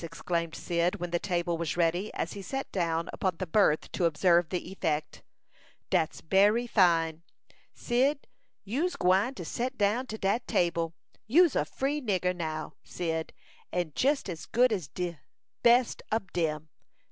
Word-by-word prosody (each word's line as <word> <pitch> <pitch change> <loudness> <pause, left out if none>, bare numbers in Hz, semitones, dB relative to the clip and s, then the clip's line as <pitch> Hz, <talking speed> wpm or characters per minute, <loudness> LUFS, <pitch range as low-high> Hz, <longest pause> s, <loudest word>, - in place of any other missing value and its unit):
exclaimed 165 0 -3
Cyd, 175 +2 0
when 175 -3 -5
the 175 - +1
table 175 -3 -1
was 170 0 -2
ready, 175 +4 +1
as - - -3
he 200 - -7
sat 270 +7 -4
down 170 -2 -1
upon 185 -3 -1
the 185 - -3
berth 165 -3 +2
to 175 - 0
observe 170 +1 +3
the 180 0 -4
effect. 155 -5 -2 0.7
"Dat's 170 -4 +1
bery 205 +7 +3
fine! 165 -7 +3 0.5
Cyd, 270 +4 +1 0.4
you'se 290 - -1
gwine 195 +9 +2
to 175 - -7
set 250 - -3
down 215 +6 +1
to 220 - -5
dat 210 +4 0
table. 170 -1 0 0.3
You'se 325 +5 +5
a - - +2
free 285 +3 -2
nigger, 185 -6 0
now, 155 -2 -4
Cyd, 160 -2 -3 0.4
and 175 -4 -2
jes 280 +2 +2
as 170 -4 -6
good 245 0 +3
as 180 -8 -3
de 175 0 -4 0.4
best 240 +1 +4
ob 215 -4 -1
dem. 155 -2 -1
180 Hz, 160 wpm, -29 LUFS, 165-220 Hz, 0.7 s, You'se